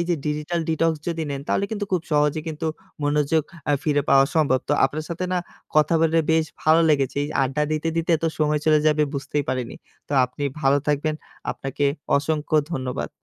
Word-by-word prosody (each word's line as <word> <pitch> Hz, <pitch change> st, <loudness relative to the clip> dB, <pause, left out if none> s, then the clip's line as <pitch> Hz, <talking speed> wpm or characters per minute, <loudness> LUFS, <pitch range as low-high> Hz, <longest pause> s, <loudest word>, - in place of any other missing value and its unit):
এইযে 170 Hz, 0 st, +1 dB
digital 150 Hz, +3 st, -1 dB
detox 165 Hz, 0 st, +2 dB, 0.2 s
যদি 165 Hz, -1 st, -2 dB
নেন, 140 Hz, -1 st, -3 dB
তাহলে 200 Hz, -, +1 dB
কিন্তু 210 Hz, -2 st, -2 dB
খুব 180 Hz, -3 st, +1 dB
সহজে 150 Hz, +1 st, +2 dB
কিন্তু 155 Hz, 0 st, -4 dB, 0.4 s
মনোযোগ 150 Hz, +2 st, +2 dB, 0.3 s
আ -, -, +4 dB
ফিরে 145 Hz, -2 st, +1 dB
পাওয়া 135 Hz, 0 st, +6 dB
সম্ভব। 145 Hz, -5 st, +3 dB
তো -, -, +2 dB
আপনার 150 Hz, +3 st, -2 dB
সাথে 175 Hz, +2 st, -3 dB
না 180 Hz, -, +2 dB, 0.4 s
কথা 155 Hz, +2 st, +4 dB
বলে 165 Hz, 0 st, +3 dB
বেশ 160 Hz, 0 st, +3 dB, 0.2 s
ভালো 160 Hz, +1 st, +5 dB
লেগেছে। 140 Hz, -3 st, +1 dB
এই -, -, -4 dB
আড্ডা 135 Hz, +3 st, 0 dB
দিতে, 155 Hz, +1 st, -1 dB
দিতে 165 Hz, +1 st, 0 dB
এতো 165 Hz, +1 st, -1 dB
সময় 150 Hz, -1 st, +2 dB
চলে 155 Hz, -1 st, +5 dB
যাবে 150 Hz, 0 st, +3 dB
বুঝতেই 145 Hz, +1 st, -2 dB
পারিনি। 130 Hz, -2 st, -2 dB, 0.3 s
তো -, -, -5 dB
আপনি 125 Hz, +3 st, -8 dB, 0.2 s
ভালো 135 Hz, 0 st, +4 dB
থাকবেন। 150 Hz, +1 st, +1 dB, 0.4 s
আপনাকে 135 Hz, +1 st, -3 dB, 0.3 s
অসংখ্য 150 Hz, +1 st, 0 dB, 0.2 s
ধন্যবাদ। 130 Hz, -4 st, -3 dB
150 Hz, 185 wpm, -23 LUFS, 140-160 Hz, 0.4 s, পাওয়া